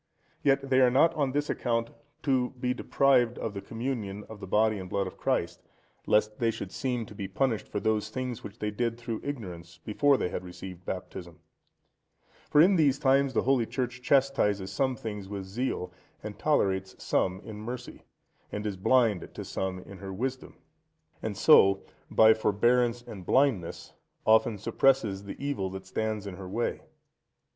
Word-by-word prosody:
Yet 140 -1 +2
they 130 0 +4
are 125 - +6
not 135 +7 +4
on 140 -3 0
this 145 +2 -1
account 115 -1 -1 0.3
to 130 -2 +1
be 125 0 0
deprived 125 -2 +2
of 110 - -4
the 100 - -5
Communion 110 -4 -4
of 110 - -9
the - - -8
Body 110 +1 +2
and 90 -1 -7
Blood 100 +1 0
of 95 - -7
Christ, - - -1 0.5
lest 105 0 +2
they 115 - +2
should 115 - -5
seem 125 -3 -2
to 105 - -12
be 100 -1 -5
punished 110 +3 -1
for 105 - -3
those 110 0 0
things 125 0 -4
which 105 +2 -9
they 105 -2 -2
did 115 +2 -1
through 120 -2 -5
ignorance 90 -12 -6
before 140 +6 +3
they 90 - -1
had - - -4
received 90 0 -9
Baptism. 90 -2 -6 1.1
For 150 - +4
in 185 +3 +5
these 140 -4 +4
times 135 0 +3
the - - +2
Holy 125 -3 +2
Church 125 -1 -3
chastises 125 -8 +2
some 130 -2 0
things 105 -4 -6
with 100 -1 -4
zeal, 95 -3 -3 0.3
and 105 -1 -7
tolerates 95 -10 +1
some 95 0 0
in 110 -1 -9
mercy, 120 +3 -7 0.5
and 105 +1 -4
is 100 -3 -3
blind 110 -1 +2
to - - -6
some 95 -1 -3
in 100 0 -12
her 95 0 -7
wisdom, 130 +6 -4 0.7
and - - -4
so, 95 0 +6 0.3
by 110 0 +7
forbearance 120 +3 +2
and 100 -5 -9
blindness 120 -6 +1 0.3
often 110 0 +4
suppresses 110 -2 +1
the 100 - -7
evil 140 -9 -2
that 95 0 -8
stands 110 +1 -2
in 95 -3 -7
her 95 -2 -8
way. 115 +5 -2
110 Hz, 175 wpm, -28 LUFS, 100-130 Hz, 1.1 s, by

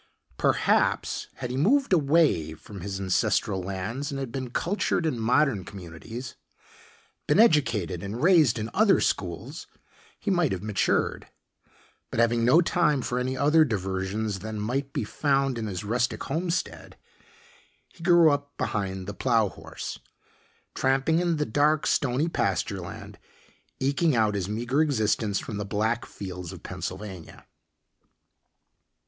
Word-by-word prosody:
Perhaps, - - +1
had 125 - -5
he 130 - -3
moved 250 - +3
away 145 - +3
from 100 +4 -11
his 95 +1 -4
ancestral 95 0 +1
lands 100 - -4
and 140 -2 -4
had 135 -3 -4
been 130 -1 -4
cultured 170 - -1
in 130 -7 -1
modern 125 -2 +2
communities, 100 +7 -8 0.9
been - - +3
educated 120 - +3
and 105 +7 -5
raised 160 -10 +5
in 110 +1 -4
other 210 -2 +4
schools, - - -3 0.5
he 205 - -1
might 175 -6 +2
have 95 0 -3
matured. 105 -3 0 0.8
But - - -3
having 115 0 +3
no 130 +9 +6
time 150 -5 +1
for 125 - -1
any 130 +1 -2
other 150 +4 +5
diversions 100 -2 -2
than 110 +1 -5
might 135 +6 -2
be - - -2
found 135 +1 0
on 110 - -3
his 95 -2 -4
rustic 120 +4 -1
homestead, 170 +5 -3 0.9
he 175 - -20
grew 175 -3 +6
up 145 0 -3
behind 95 -2 -2
the 100 - -5
plow 115 -2 +2
horse, - - -8 0.7
tramping 135 +5 +2
in 175 -1 +1
the 150 - 0
dark, 150 +6 +2
stony 140 +3 +1
pasture 170 - -1
land, - - -9 0.6
eking 140 +3 +2
out 110 -2 +2
his 100 -2 -2
meager 120 +7 0
existence 110 -7 +1
from 105 - -5
the 105 - -2
black 110 +3 -1
fields 90 -3 -7
of - - -11
Pennsylvania. 95 -2 -7
120 Hz, 140 wpm, -26 LUFS, 100-145 Hz, 0.9 s, no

